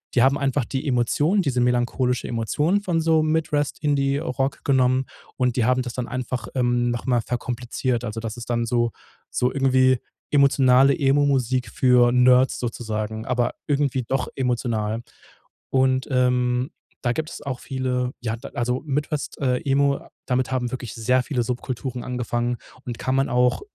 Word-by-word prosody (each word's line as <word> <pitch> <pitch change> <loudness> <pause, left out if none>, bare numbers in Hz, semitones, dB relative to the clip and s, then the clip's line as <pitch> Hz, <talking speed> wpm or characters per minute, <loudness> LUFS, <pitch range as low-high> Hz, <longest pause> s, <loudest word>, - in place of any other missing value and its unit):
die 120 - +5
haben 135 +3 +4
einfach 140 -1 0
die 135 +5 -4
Emotionen 145 - +2
diese 135 -7 0
melancholische 125 +1 +1
Emotionen 150 - 0
von 175 -4 0
so 160 -1 +3
Midwest-Indie-Rock 145 -3 0
genommen 130 -1 +2 0.3
und 125 -2 +1
die 120 - +2
haben 130 +1 +2
das 120 -1 -5
dann 125 -2 -3
einfach, 125 +1 -4
ähm, 120 -1 +1
noch 120 +2 -4
mal 120 -2 +3
verkompliziert. 120 +1 -2
Also, 115 -1 -4
das 115 +1 -5
ist 120 - -8
dann 120 0 +1
so 120 -1 +1 0.4
so 125 +1 +1
irgendwie 130 -2 +3 0.3
emotionale 135 -1 +5
Emo-Musik 135 -3 +2
für 125 0 +4
Nerds 125 +1 +4
sozusagen, 110 -2 -4
aber 120 -1 0
irgendwie 140 -3 +1
doch 135 +2 0
emotional. 115 -4 -1 0.7
Und, 130 0 +2
ähm, 125 0 +1 0.3
da 120 - +1
gibt's 155 +4 -5
auch 130 -3 -4
viele 125 -1 -2
ja, 110 -2 -2
da - - -9
also, 125 +2 -1
Midwest, 150 +1 -3
äh, 125 -2 +1
Emo, 140 0 +1 0.2
damit 125 -1 0
haben 125 -2 -1
wirklich 125 -4 -5
sehr 125 +3 +2
viele 125 -3 -1
Subkulturen 125 +1 -4
angefangen 120 -1 -2 0.3
und 120 -2 -5
kann 130 - -1
man 135 0 +1
auch 125 0 +2
125 Hz, 155 wpm, -23 LUFS, 120-135 Hz, 0.7 s, die